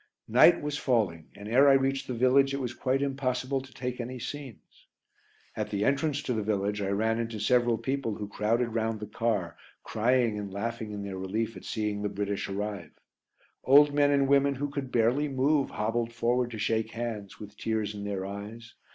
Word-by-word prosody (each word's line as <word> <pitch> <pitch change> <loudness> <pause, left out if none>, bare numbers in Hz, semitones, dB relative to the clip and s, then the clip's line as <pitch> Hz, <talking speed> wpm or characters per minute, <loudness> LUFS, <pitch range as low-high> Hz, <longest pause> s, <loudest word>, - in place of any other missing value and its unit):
Night 125 +10 +6
was 150 0 -2
falling, 100 - 0
and 100 +1 -9
ere 135 +5 +5
I - - +7
reached 135 0 +1
the 125 - -3
village 135 +3 +3
it - - -3
was 125 -3 -3
quite 130 +3 0
impossible 135 -1 -1
to 130 0 -14
take 125 -1 -4
any 125 +2 -6
scenes. 135 -1 -9 0.7
At - - -3
the 100 +1 -1
entrance 145 +1 +1
to 125 - -1
the 110 - -1
village 105 0 -1
I 100 - -1
ran 110 +3 +1
into 115 -2 -3
several 120 +1 +3
people 130 -5 -2
who 105 -1 -5
crowded 115 +4 0
round 115 -1 -1
the 105 - -5
car, 105 -6 -1 0.3
crying 115 -1 +1
and 100 -1 -6
laughing 110 +2 -4
in 100 -1 -5
their 95 -2 -5
relief 110 +4 -2
at - - -10
seeing 105 -2 -2
the 105 - -1
British 100 0 -3
arrive. 100 -3 -4 0.7
Old 145 +2 +6
men 145 0 +4
and 140 -1 +3
women 140 0 +3
who 145 +2 -3
could 140 -2 -4
barely 120 +6 +2
move 140 +1 +1
hobbled 115 +2 -1
forward 120 +1 +1
to 115 - -7
shake 110 +1 -1
hands, 115 -4 -5
with 105 0 -10
tears 110 -1 -2
in 100 -1 -7
their 100 -2 -3
eyes. 105 +4 -8
115 Hz, 195 wpm, -28 LUFS, 105-135 Hz, 0.7 s, I